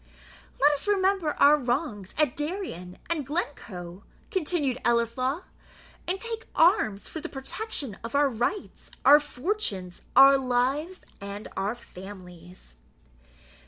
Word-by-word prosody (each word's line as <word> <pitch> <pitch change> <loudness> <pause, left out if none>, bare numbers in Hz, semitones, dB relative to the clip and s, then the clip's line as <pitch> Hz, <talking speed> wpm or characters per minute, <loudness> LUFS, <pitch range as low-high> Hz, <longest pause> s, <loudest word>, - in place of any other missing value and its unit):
"Let 290 +2 +6
us 290 +5 -2
remember 385 -5 +2
our 290 +1 +6
wrongs 245 - -2
at 300 -5 +2
Darien 295 - -5
and 330 -3 -1
Glencoe," 205 - -5 0.3
continued 310 - 0
Ellieslaw, 240 +6 +1 0.7
"and 375 +2 -1
take 455 0 -5
arms 320 - +3
for 320 - -7
the - - -6
protection 270 - -5
of 230 +3 -5
our 285 0 +5
rights, 250 - -3 0.2
our 295 +1 +9
fortunes, 255 - -3
our 275 0 +8
lives, 265 +8 -1 0.2
and 200 +2 -7
our 200 +4 -1
families." 180 - -12
270 Hz, 120 wpm, -27 LUFS, 205-330 Hz, 0.7 s, our